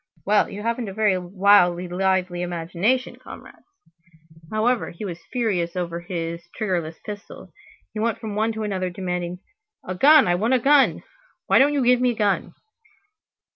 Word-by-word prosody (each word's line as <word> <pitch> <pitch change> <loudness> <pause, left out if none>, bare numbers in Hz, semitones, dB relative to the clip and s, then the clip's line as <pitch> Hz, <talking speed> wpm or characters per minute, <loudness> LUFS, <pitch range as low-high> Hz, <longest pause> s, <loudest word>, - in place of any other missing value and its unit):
Well, 205 +1 +3
you 205 +1 -7
haven't 230 0 -2
a 190 - -9
very 210 -4 +2
wildly 180 -1 +3
lively 185 -1 0
imagination, 180 +8 -1
comrades." - - -13 0.8
However, 225 +2 0
he 170 +5 -8
was 175 -3 -6
furious 190 -9 -1
over 170 -2 -3
his 170 -2 -5 0.2
triggerless 175 -7 -2
pistol. 205 -1 -9 0.4
He 215 - -5
went 230 +1 0
from 220 -2 -6
one 220 +2 0
to 220 0 -4
another, 190 -3 -2
demanding: 180 -1 -4 0.5
"A 185 - -3
gun, 285 +8 +6
I 175 - +3
want 220 +8 +1
a - - +2
gun! 280 +3 +3 0.4
Why - - +4
don't 285 +2 +4
you 275 -4 +1
give 250 0 +4
me 250 -1 +2
a - - -12
gun?" 205 -2 -1
200 Hz, 165 wpm, -23 LUFS, 175-225 Hz, 0.8 s, gun